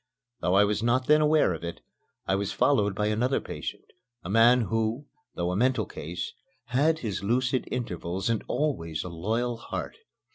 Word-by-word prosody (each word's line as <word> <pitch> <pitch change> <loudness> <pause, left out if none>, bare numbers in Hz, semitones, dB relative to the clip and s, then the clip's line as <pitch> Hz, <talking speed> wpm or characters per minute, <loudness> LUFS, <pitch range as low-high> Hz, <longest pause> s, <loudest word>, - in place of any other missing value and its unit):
Though 90 - +1
I 100 - +7
was 105 +1 0
not 125 +3 +2
then 150 +2 +5
aware 150 -10 +4
of 80 - -7
it, 85 0 -6 0.4
I 95 - +1
was 100 0 0
followed 105 -8 +2
by 105 - 0
another 115 +5 +1
patient, - - -6 0.4
a 90 - -5
man 120 +3 +6
who, 115 +4 -1 0.3
though 85 0 -1
a - - -2
mental 120 0 +2
case, 85 +2 -6 0.4
had 150 +6 +3
his 105 -8 -4
lucid 125 +4 +1
intervals 95 -6 -3
and 115 -3 0
always 85 - -1
a 90 - -6
loyal 115 +8 -1
heart. 115 - -6
110 Hz, 175 wpm, -27 LUFS, 95-125 Hz, 0.4 s, I